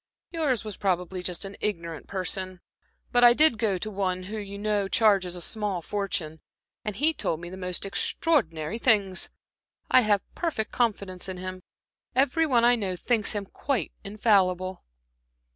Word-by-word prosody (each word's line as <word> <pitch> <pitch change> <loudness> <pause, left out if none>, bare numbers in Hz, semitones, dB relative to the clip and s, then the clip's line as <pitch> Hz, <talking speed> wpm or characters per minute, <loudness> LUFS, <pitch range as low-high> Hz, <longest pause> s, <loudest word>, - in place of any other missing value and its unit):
"Yours 295 -9 0
was 215 -3 -7
probably 180 -1 -1
just 180 +1 -3
an 195 0 -7
ignorant 170 -6 -3
person. 185 -1 -2 0.5
But 245 -1 +4
I 240 0 +9
did 305 -6 +4
go 205 -5 +1
to, 215 +4 -5 0.3
who, 210 +4 -6
you 200 -1 -7
know, 205 -1 0
charges 195 -4 +3
a 175 - -5
small 205 -3 -2
fortune, 170 -5 -3 0.4
and 210 -2 -4
he 305 +8 +2
told 160 - -2
me 175 +1 -8
the - - -7
most 180 0 -2
extraordinary 195 - 0
things. 200 -6 +3 0.6
I 255 - +7
have 210 -3 +2
perfect 305 -11 -2
confidence 200 -6 -1
in 185 - -5
him; 185 0 -6 0.5
every 280 +5 +3
one 240 -4 +4
I 245 0 +6
know 195 -5 -2
thinks 220 +3 +1
him 205 -1 -3
quite 245 - -2
infallible." 190 -3 +1
200 Hz, 160 wpm, -27 LUFS, 185-230 Hz, 0.6 s, I